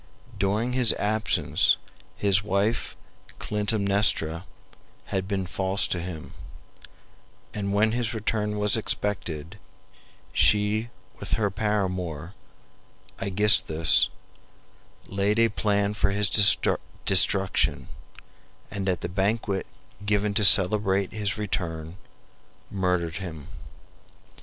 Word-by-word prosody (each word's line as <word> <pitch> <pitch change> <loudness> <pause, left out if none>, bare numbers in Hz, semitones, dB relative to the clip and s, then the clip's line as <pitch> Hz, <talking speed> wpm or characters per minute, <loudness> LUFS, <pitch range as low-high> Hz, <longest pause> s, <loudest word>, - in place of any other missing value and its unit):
During 105 +5 -1
his 125 -3 +5
absence 110 +1 +1 0.4
his 100 -1 +2
wife 105 +3 -1 0.4
Clytemnestra 100 -5 0 0.6
had 95 -1 -3
been 95 -2 -2
false 95 +3 0
to 90 - -1
him, 85 -3 -8 1.2
and 100 -1 -3
when 105 +2 +2
his 115 -1 -2
return 105 -1 -2
was 105 +1 +4
expected, 100 -5 -3 0.7
she 105 +2 +2 0.3
with - - -3
her 105 -2 0
paramour, 95 -5 -3 0.9
Aegisthus, 95 -5 +4 1.0
laid 100 +2 -1
a 115 0 +4
plan 100 -1 0
for 105 -1 0
his 100 -1 0 0.7
destruction, 95 0 +3 0.8
and 95 -1 -3
at 90 -2 -2
the - - -3
banquet 100 +1 -2 0.4
given 105 0 0
to 105 - 0
celebrate 100 0 +4
his 105 0 -3
return, 85 -5 -4 0.7
murdered 90 -4 -1
him. 80 -7 -8
100 Hz, 95 wpm, -25 LUFS, 95-105 Hz, 1.2 s, his